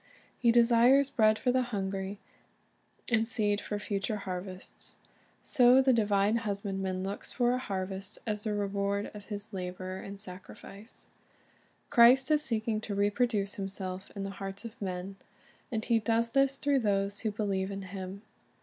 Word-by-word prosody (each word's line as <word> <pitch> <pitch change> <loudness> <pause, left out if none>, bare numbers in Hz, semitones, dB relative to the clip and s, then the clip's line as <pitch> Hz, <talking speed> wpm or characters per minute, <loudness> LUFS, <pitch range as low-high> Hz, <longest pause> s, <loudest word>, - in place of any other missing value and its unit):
He 235 -2 +4
desires 240 +4 +5
bread 215 -3 +4
for 250 - +1
the 255 +1 +3
hungry, 195 -4 -3 0.9
and 225 -1 +2
seed 210 -3 +1
for 210 - -3
future 205 +1 -2
harvests. 185 -1 -7 0.5
So 250 0 +6
the 265 -1 +4
divine 210 -1 +3
Husbandman 195 -3 -2
looks 195 +1 -5
for 245 -1 +2
a 255 - 0
harvest 195 -2 -4
as 210 -2 -2
the 210 -1 -2
reward 200 0 -1
of 205 -1 -10
His 205 0 -6
labor 185 0 -5
and 195 +1 -8
sacrifice. 195 +3 -9 0.9
Christ 255 +4 +6
is 300 -1 +4
seeking 220 -5 -1
to 205 -2 -4
reproduce 205 0 +1
Himself 190 -1 -5
in 200 - -4
the 195 - -4
hearts 195 +2 -6
of 230 -1 -9
men; 190 0 -4 0.5
and 220 -2 -2
He 230 -1 +3
does 230 +1 +1
this 275 +1 +3
through 280 -1 +2
those 200 -2 0
who 220 - -1
believe 200 -2 -1
in 195 0 -5
Him. 190 +1 -7
205 Hz, 155 wpm, -30 LUFS, 195-230 Hz, 0.9 s, So